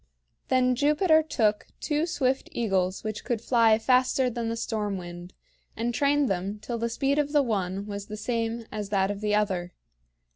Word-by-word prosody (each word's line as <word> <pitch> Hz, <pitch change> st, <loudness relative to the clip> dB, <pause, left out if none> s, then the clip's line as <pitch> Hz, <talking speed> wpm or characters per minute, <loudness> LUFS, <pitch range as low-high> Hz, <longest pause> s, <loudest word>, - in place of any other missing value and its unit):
Then 255 Hz, -1 st, +3 dB
Jupiter 300 Hz, +5 st, +4 dB
took 220 Hz, -9 st, 0 dB
two 300 Hz, +2 st, 0 dB
swift 265 Hz, -5 st, 0 dB
eagles 190 Hz, -5 st, 0 dB
which 215 Hz, -1 st, -4 dB
could 240 Hz, -2 st, -1 dB
fly 230 Hz, -1 st, +4 dB
faster 255 Hz, +2 st, +2 dB
than 230 Hz, -1 st, -3 dB
the 230 Hz, -, -2 dB
storm 210 Hz, -3 st, -2 dB
wind, 175 Hz, 0 st, -9 dB, 0.4 s
and 235 Hz, +2 st, -1 dB
trained 285 Hz, +2 st, +2 dB
them 195 Hz, +1 st, -2 dB
till 235 Hz, +2 st, -5 dB
the 235 Hz, +1 st, -1 dB
speed 275 Hz, +5 st, 0 dB
of 290 Hz, 0 st, -1 dB
the 290 Hz, -1 st, +5 dB
one 195 Hz, -4 st, -2 dB
was 200 Hz, -1 st, -6 dB
the 215 Hz, -, -6 dB
same 230 Hz, +1 st, -2 dB
as 210 Hz, -2 st, -4 dB
that 195 Hz, -1 st, +1 dB
of 205 Hz, 0 st, -6 dB
the 210 Hz, -1 st, +1 dB
other. 185 Hz, -4 st, -1 dB
225 Hz, 180 wpm, -27 LUFS, 205-255 Hz, 0.4 s, the